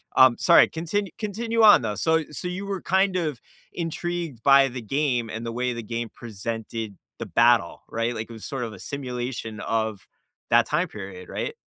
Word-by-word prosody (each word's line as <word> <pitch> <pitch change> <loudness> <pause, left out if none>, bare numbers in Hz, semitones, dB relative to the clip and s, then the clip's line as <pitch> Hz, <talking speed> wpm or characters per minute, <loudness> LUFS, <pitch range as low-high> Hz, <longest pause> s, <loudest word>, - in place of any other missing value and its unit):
Um, 130 -2 +7
sorry, 170 - +6
continu 175 +4 -2
continue 225 +2 -1
on, 210 -10 +8
though. 105 -2 -2
So 160 -1 +2
so 180 - -4
you 185 +3 -4
were 195 -2 -3
kind 190 +1 +2
of 155 -8 -2 0.3
intrigued 170 -5 -4
by 135 0 +7
the 125 +1 -6
game 125 0 0
and 110 +1 -5
the 115 - -3
way 125 +1 -1
the 115 - -5
game 115 +1 -4
presented 115 -1 -5 0.2
the - - -4
battle, - - +3
right? 115 +1 -1
Like, 110 +1 -5
it - - -9
was 110 - -8
sort 135 -3 -3
of 110 -2 -5
a 95 - -11
simulation 125 -5 -5
of 110 -3 -2 0.4
that - - +6
time - - 0
period, 95 -3 -9
right? - - -4
125 Hz, 190 wpm, -25 LUFS, 115-170 Hz, 0.4 s, on